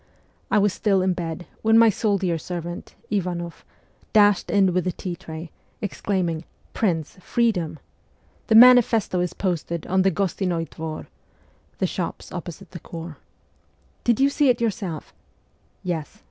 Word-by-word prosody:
I - - +3
was 205 -2 +3
still 195 -4 +2
in 185 -1 +2
bed, 170 0 -5 0.2
when 225 +1 +5
my 230 -1 +7
soldier 195 -5 0
servant, 175 0 -6 0.2
Ivanoff, 175 -4 -3 0.5
dashed 205 -3 +4
in 195 -3 +3
with 185 0 0
the 180 - +1
tea 175 +1 -5
tray, 160 0 -8 0.3
exclaim 195 -2 -1
ing, 165 -1 -3 0.3
'Prince, 165 -8 -1
freedom! 185 -9 0 0.7
The 220 - +3
manifesto 235 -5 +7
is 180 -1 -1
posted 170 -3 -2
on 190 +1 +2
the 195 - +4
Gostinoi 180 -2 -1
Dvor 160 -1 -6 0.4
' - - -35
(the - - +1
shops - - -4
opposite 175 +1 -7
the 175 - -7
corps). 165 -2 -8 0.5
' 70 -3 -38
Did 235 +1 +2
you 275 +1 +5
see 290 -1 +3
it 245 - +3
yourself? 200 -8 -3 0.4
' - - -40
'Yes. 165 -4 -4
180 Hz, 155 wpm, -24 LUFS, 170-205 Hz, 0.7 s, my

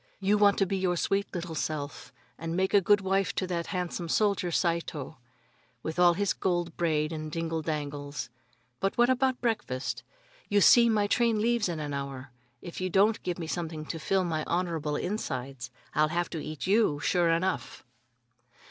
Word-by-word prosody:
You 200 +1 +2
want 200 -1 +5
to 195 - +3
be 195 +1 -1
your 180 -2 0
sweet 195 +3 0
little 175 -2 -4
self, 150 -2 -4 0.2
and 165 +4 -4
make 190 0 +1
a 200 - +6
good 205 +2 +4
wife 195 0 0
to 185 - 0
that 175 -2 -3
handsome 180 -2 -3
soldier 200 -2 +2
Saito, 165 -6 -2 0.6
with 160 +2 -4
all 175 -1 +6
his 200 +1 +1
gold 175 -3 -1
braid 155 -2 0
and 155 -1 -5
dingle 165 0 -2
dangles. 145 -2 -4 0.5
But 195 - -1
what 240 +1 +5
about 260 0 +1
breakfast? 215 - -2 0.5
You 205 - +4
see, 235 +4 +7
my 210 -2 +2
train 230 +1 +2
leaves 230 -2 +1
in 165 -2 -3
an 145 -1 -4
hour. 140 -2 -5 0.3
If 175 +1 -7
you 185 - -1
don't 205 +4 +3
give 180 -2 -3
me 170 - -4
something 160 -2 -4
to 165 - -5
fill 190 +4 +1
my 160 -3 -1
honorable 165 -4 -1
insides, 135 - -4 0.2
I'll 155 0 +3
have 175 +2 -2
to 160 -3 -4
eat 155 0 -5
you, 195 -7 +3
sure 170 +2 +2
enough." 175 +3 -1
175 Hz, 180 wpm, -29 LUFS, 155-195 Hz, 0.6 s, see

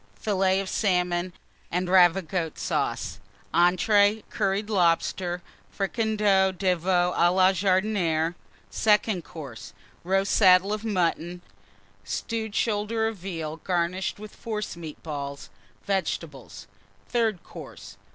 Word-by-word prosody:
Fillets 190 -2 +1
of - - -9
Salmon 180 -3 0 0.4
and 180 +1 -1
Ravigotte 175 -2 +3
Sauce. - - -2 0.3
ENTREES. 205 +5 +3
Curried 200 0 -1
Lobster. 175 -2 +1 0.3
Fricandeau 205 -2 +1
de 185 0 +1
Veau 180 +1 +1
à 175 +1 +4
la 185 +1 +5
Jardinière. 185 -4 +1 0.4
SECOND 210 -4 +2
COURSE. 135 -11 -10 0.3
Roast 195 +2 +1
Saddle 190 0 +5
of 215 0 -4
Mutton. 175 -4 -1 0.6
Stewed 220 -2 -4
Shoulder 220 +1 0
of 225 -1 -4
Veal, 165 -4 -5
garnished 180 +2 -1
with 215 +1 -11
Forcemeat 195 -8 -6
Balls. 140 -3 -6 0.3
Vegetables. 195 -2 -3 0.4
THIRD 225 -7 0
COURSE. - - -11
185 Hz, 105 wpm, -26 LUFS, 175-205 Hz, 0.6 s, la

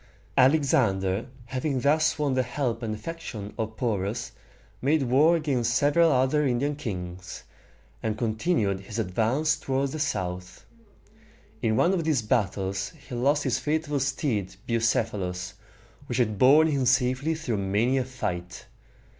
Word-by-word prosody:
Alexander, 110 -8 +3 0.2
having 130 +2 -2
thus 155 +4 +2
won 145 -3 0
the 130 - +2
help 125 -2 -2
and 110 -2 -3
affection 110 -6 -7
of 110 0 -4
Porus, 115 -1 -2 0.5
made 145 +2 +2
war 140 +7 +4
against 130 -7 0
several 160 +3 +4
other 135 +3 +2
Indian 140 +2 0
kings, 90 -8 -6 0.6
and 110 -1 -2
continued 110 - 0
his 100 +3 -8
advance 115 +9 +1
toward 135 -1 -1
the 155 - -5
south. 90 -10 -3 1.0
In 110 -1 +1
one 175 - +3
of 175 -3 0
these 150 -7 +1
battles 100 -4 -1 0.2
he - - -7
lost 140 +5 +2
his 130 -2 0
faithful 150 +1 -1
steed 130 - -1
Bucephalus, 105 -5 -1 0.5
which 120 - -2
had 110 -5 0
borne 145 +5 +7
him 135 -4 0
safely 130 +5 +2
through 135 -9 -2
many 105 +7 +1
a - - 0
fight. 90 -9 -5
125 Hz, 140 wpm, -26 LUFS, 105-145 Hz, 1.0 s, borne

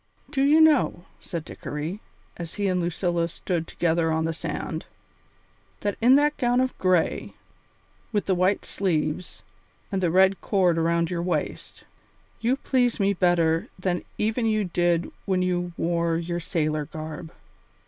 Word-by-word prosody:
"Do 270 - 0
you 295 +3 +5
know," 295 - +4
said 170 -4 -6
Dickory, 160 +8 -5 0.3
as 170 -1 -7
he 205 - -1
and 185 -2 +1
Lucilla 175 0 0
stood 170 0 -3
together 165 -1 +1
on 160 0 +1
the 165 - -1
sand, - - -5 0.9
"that 205 -1 -1
in 250 +3 +7
that 295 +1 +3
gown 245 0 +2
of 260 0 0
gray, 185 -3 +1 0.8
with 205 -3 0
the 190 - +2
white 185 +2 +1
sleeves, 170 -2 -2 0.5
and 195 -1 -1
the 175 - +2
red 190 +3 +4
cord 180 -5 +2
around 170 +1 +1
your 170 -1 -1
waist, 170 -4 -3 0.6
you 240 +3 +2
please 250 -4 +1
me 200 0 +3
better 170 -3 +2
than 185 -1 -1
even 225 +2 0
you 215 -1 +2
did 175 -2 +1
when 185 -2 +1
you 175 -1 -1
wore 170 -1 +1
your 170 +1 -3
sailor 155 -3 -1
garb?" 155 +1 -7
175 Hz, 150 wpm, -25 LUFS, 165-200 Hz, 0.9 s, in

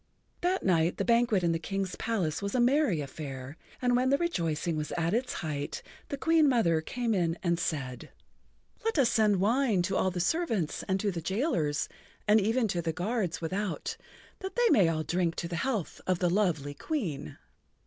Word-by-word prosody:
That 365 +2 +1
night 170 -2 +2
the 195 - -1
banquet 235 -5 +3
in 170 - +3
the 165 - 0
King's[Pg 195 +2 -2
62] - - -8
palace 200 -9 -1
was 200 +2 -3
a - - +2
merry 245 - +3
affair, 135 -1 -7 0.3
and 245 0 +3
when 255 +1 +2
the 280 - +4
rejoicing 170 - -1
was 150 -1 -3
at 170 +1 0
its 250 +3 0
height 145 -2 -4 0.3
the 280 - -3
Queen 320 0 +4
Mother 170 -11 +3
came 235 +7 -2
in 170 -3 +1
and 170 -1 +1
said: 135 -7 -3 0.7
"Let 450 -5 0
us 250 -5 +4
send 215 -3 +4
wine 220 -2 +2
to 190 - -1
all 190 - +2
the 180 -1 -4
servants 220 - 0
and 190 0 +1
to 205 - +1
the 170 -2 -4
jailers 170 - 0 0.4
and 210 +1 +6
even 225 +3 +2
to 175 -2 0
the 165 -1 -1
guards 185 +1 -2
without, 185 +3 -2 0.4
that 380 0 -6
they 485 -1 +4
may 185 -6 +5
all 155 -1 -1
drink 175 0 0
to 170 - -3
the 170 0 -4
health 230 -8 -2
of 185 -1 +2
the 175 -1 +1
lovely 170 -8 +1
Queen." 160 - -4
190 Hz, 195 wpm, -29 LUFS, 165-240 Hz, 0.7 s, and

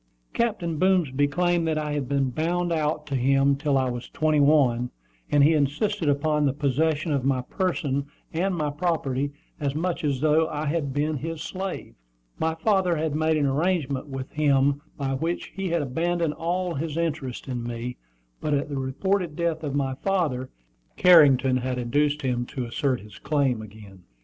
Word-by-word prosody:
Captain 175 -9 -1
Boomsby 155 -7 +3
claimed 175 +2 +1
that 160 -1 0
I 150 -1 -2
had 145 -4 -2
been 135 -2 +1
"bound 175 +5 -1
out" 150 -1 0
to 140 -2 -3
him 135 +2 +3
till 140 -1 +1
I 130 -1 +1
was 120 -1 -5
twenty 155 -1 +1
one; 135 -5 +3 0.4
and 145 -1 +4
he 155 +3 +5
insisted 155 +5 0
upon 150 +1 +1
the 135 - +1
possession 155 +3 0
of 140 -3 0
my 130 -1 +1
person 145 -4 -1 0.3
and 180 +3 0
my 150 -3 -1
property 145 -4 -1 0.3
as 140 -1 -1
much 170 +2 -2
as 140 -3 0
though 155 +2 +3
I 155 -1 -3
had 145 -2 -1
been 150 +2 0
his 160 +2 -5
slave. 190 0 -5 0.5
My 160 0 0
father 190 -1 +2
had 155 -1 -1
made 155 +1 +2
an 145 - +2
arrangement 145 -1 0
with 135 -1 -6
him 140 -1 +2 0.2
by 135 -2 -1
which 165 +6 -2
he 195 -1 -2
had 170 -2 +1
abandoned 165 +4 0
all 175 +2 -2
his 155 +1 -3
interest 150 -8 -3
in 125 -2 -3
me, 120 +1 -5 0.4
but 150 -1 0
at 140 +1 -1
the 140 -2 -3
reported 170 +6 -1
death 165 -1 -1
of 145 -2 -3
my 135 -2 0
father, 145 -6 -1 0.5
Carrington 140 -7 +6
had 130 0 -2
induced 145 +4 0
him 120 -2 -1
to 130 -4 -4
assert 125 +2 -1
his 105 +1 -13
claim 135 -6 +1
again. 100 -3 -12
150 Hz, 180 wpm, -25 LUFS, 135-165 Hz, 0.5 s, Carrington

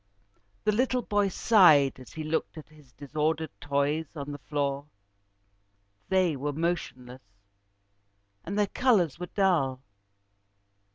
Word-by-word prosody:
The 210 - +2
little 250 +3 0
boy 205 -1 +1
sighed 165 - +4
as 130 - -13
he 160 - -5
looked 160 +1 -2
at 155 - -10
his 150 -4 -20
disordered 155 +3 -2
toys 145 +2 -1
on 145 -1 -6
the 145 - -7
floor. 140 +1 -3 1.2
They 185 -4 +2
were 145 +2 -3
motionless, 130 -6 -4 1.2
and 200 - -5
their 210 - +3
colours 195 - +1
were 180 - -5
dull. 155 -10 +1
155 Hz, 120 wpm, -28 LUFS, 140-185 Hz, 1.2 s, sighed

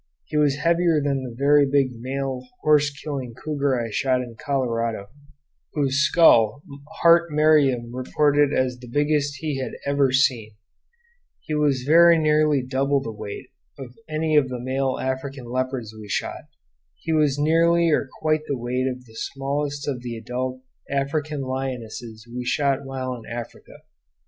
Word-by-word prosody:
He - - -8
was 150 -2 +3
heavier 165 +1 +2
than 140 -2 -1
the 125 -3 -7
very 145 +2 +5
big 135 -1 +2
male 130 +1 -3 0.2
horse 150 -1 +4
killing 135 -3 -6
cougar 140 -2 -1
I 115 -1 -4
shot 130 +2 +1
in 120 -2 -10
Colorado, 115 -6 -2 0.6
whose 140 -3 0
skull 140 -5 +4 0.4
Hart 170 0 +5
Merriam 145 -6 +3
reported 145 +2 +2
as 130 -3 0
the 125 - -11
biggest 145 +2 0
he 150 -4 -2
had 130 - -4
ever 140 -2 +2
seen; 125 -5 +1 0.9
he 155 - -6
was 145 -4 +1
very 170 +4 +6
nearly 150 -3 +2
double 135 +2 0
the 115 -4 -6
weight 105 -2 -8 0.3
of 130 -3 -9 0.2
any 155 0 0
of 140 -3 +4
the 125 -1 -5
male 130 +1 -1
African 130 0 -4
leopards 125 -2 -3
we 110 -1 -11
shot; - - -3 0.5
he 160 - -3
was 150 -3 +2
nearly 165 +2 +3
or 140 -2 +1
quite 155 0 0
the 140 - -1
weight 125 +2 -2
of 125 -1 -5
the 110 - -18
smallest 140 +3 -3
of 130 -4 -2
the 120 -2 -5
adult 125 +3 -4 0.3
African 145 +2 -2
lionesses 120 -4 -5
we 125 +1 -5
shot 140 +2 0
while 130 -1 -4
in 120 -3 -10
Africa. 120 -1 -9
135 Hz, 155 wpm, -23 LUFS, 125-150 Hz, 0.9 s, very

